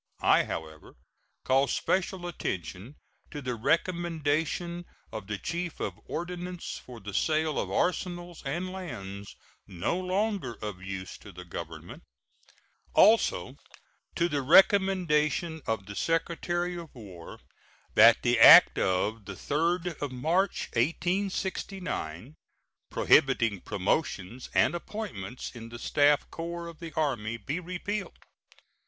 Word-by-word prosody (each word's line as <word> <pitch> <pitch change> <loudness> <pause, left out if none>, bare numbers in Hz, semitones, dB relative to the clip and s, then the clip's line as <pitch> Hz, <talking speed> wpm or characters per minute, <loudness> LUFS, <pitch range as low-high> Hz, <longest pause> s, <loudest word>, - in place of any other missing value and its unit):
I, - - +5
however, 80 -1 -7 0.5
call 135 +1 +3
special 185 +2 -1
attention 100 - -5 0.3
to 145 - -6
the 130 -3 -3
recommendation 170 +4 -1 0.3
of 110 -3 -7
the 105 -1 -3
Chief 170 - -4
of - - -2
Ordnance 180 0 -5
for 125 -2 -11
the 100 0 -8
sale 155 +5 +1
of - - -2
arsenals 175 -1 -2
and 175 +7 -3
lands 100 - -7 0.3
no 90 - -2
longer 190 - -1
of 105 -4 -6
use 95 -1 -6
to 105 - -12
the 90 -1 -10
Government; 85 -1 -8 0.9
also, 230 - +4 0.6
to 170 - +2
the 145 -4 -1
recommendation 170 -1 +3
of 110 -3 -1
the 100 +1 -8
Secretary 175 - -1
of 165 -4 -11
War 95 -8 -11 0.5
that 115 +1 +7
the 120 -1 +2
act - - +9
of 95 +4 +1
3d 165 - -1
March, 165 +10 0
1869, 175 - -2 0.5
prohibiting 115 -8 +3
promotions 100 - -2
and - - +4
appointments 170 - -6
in 115 -1 -9
the 120 - -8
staff 145 +4 +3
corps 170 +1 -5
of 170 -2 -10
the 165 -2 -7
Army, 120 -8 -1
be 135 - -4
repealed. 185 +4 -4
150 Hz, 115 wpm, -28 LUFS, 110-175 Hz, 0.9 s, act